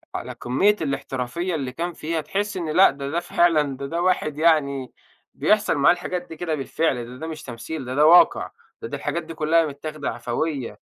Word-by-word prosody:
على - - -5
كمّية 195 +13 +2
الاحترافية 140 +4 -3
اللي 135 -4 -3
كان 170 +5 -4
فيها، 160 +1 -3
تحس 195 +5 -3
إن 165 -3 -3
لأ، 185 +2 +6
ده 140 0 -6
ده 170 +3 0
فعلًا، 155 -6 +2
ده 140 - -5
ده 170 +5 -2
واحد 165 -5 0
يعني 140 -5 +2 0.4
بيحصل 215 -5 +2
معاه 145 +5 +6
الحاجات 180 0 -4
دي 165 - -9
كده 160 -2 -2
بالفعل، 145 +1 0
لإن 120 +2 -7
ده 160 - -5
مش 155 -1 -7
تمثيل، 130 +4 -6
ده 130 +1 -4
ده 150 +1 +5
واقع. 175 +3 +6 0.3
ده 450 - -5
ده - - -5
الحاجات 170 -1 -3
دي 165 +1 -8
كلها 160 +1 +2
متّاخدة 150 0 -5
عَفويّة. 125 +3 -3
155 Hz, 200 wpm, -23 LUFS, 140-170 Hz, 0.4 s, لأ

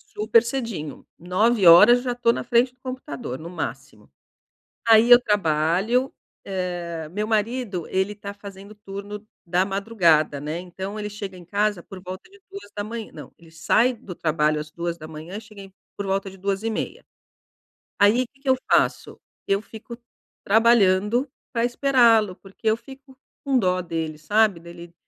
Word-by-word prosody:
Super 220 +2 +4
cedinho, 230 - -5
9:00 210 +4 +5
já 250 - -1
estou 240 -1 +2
na - - -4
frente 245 +1 +2
do 255 - -38
computador, 140 - -6
no 165 +2 -8
máximo. 180 - -7 0.8
Aí 225 +1 +6
eu 245 0 +10
trabalho, 200 - +1 0.3
eh 175 -4 -4
meu 210 +3 -3
marido, 215 -4 -1
ele 190 +2 0
tá 200 0 -8
fazendo 200 0 -12
turno 205 +1 -8 0.2
da 180 +2 +1
madrugada, 175 -8 +2
né. 155 +3 -4
Então, 190 +4 -7
ele 210 0 -4
chega 200 -2 -7
em 175 - -12
casa 205 0 -1
por 190 -2 -11
volta 185 - -9
de 400 0 -19
2:00 225 - -7
não - - -11
ele 165 -1 -18
sai 220 +10 +2
do 205 -6 -10
trabalho 155 -2 0
às 150 0 -7
2:00, 170 +1 -6
e - - -5
chega 205 -3 -13 0.3
por 200 - -3
volta 195 0 -1
de 190 - -14
2:30. 200 +3 -3 0.9
Aí, 210 +5 +4
o - - -5
que 275 - -30
que 275 - -7
eu 260 - +5 0.2
faço? - - +1 0.3
Eu 195 0 +1
fico 225 +2 -11 0.4
trabalhando 220 +3 +3 0.2
pra 230 -1 0
esperá-lo, 235 -6 +3
porque 195 +3 -14
eu 220 - 0
fico 270 0 -15 0.3
com 270 -2 +2
dó 185 -3 +1
dele, 160 -2 -4
sabe. 205 +3 +2
Dele 170 0 -12
200 Hz, 155 wpm, -23 LUFS, 175-230 Hz, 0.9 s, eu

